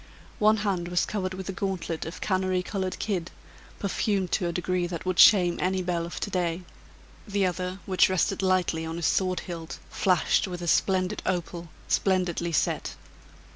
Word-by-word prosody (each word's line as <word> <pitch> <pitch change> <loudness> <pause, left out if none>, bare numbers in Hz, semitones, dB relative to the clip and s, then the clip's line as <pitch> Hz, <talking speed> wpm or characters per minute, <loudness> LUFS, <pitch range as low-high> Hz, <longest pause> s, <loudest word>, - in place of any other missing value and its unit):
One 215 +1 +5
hand 180 -4 0
was 175 0 +1
covered 185 -3 -3
with 190 -1 -7
a - - 0
gauntlet 185 -4 -3
of 165 - -8
canary 185 -2 0
colored 190 -1 -3
kid, 185 -6 -2 0.5
perfumed 195 -2 -1
to 180 - +1
a - - -1
degree 180 +1 -1
that 170 -1 -6
would 185 -2 -1
shame 180 -4 +7
any 185 0 0
belle 170 -1 -1
of 170 - -6
to 205 - -3
day, 175 -1 -1 0.6
the 200 -1 +1
other, 180 +1 -2
which 185 -2 +4
rested 185 +1 +1
lightly 185 -3 +1
on 160 0 -4
his 170 - -2
sword 185 -1 +1
hilt, 165 -2 -7
flashed 185 +1 +2
with 175 -1 -6
a - - -4
splendid 185 +1 +1
opal, 175 -2 -2 0.2
splendidly 180 -3 +1
set. 160 - 0
185 Hz, 175 wpm, -27 LUFS, 175-190 Hz, 0.6 s, shame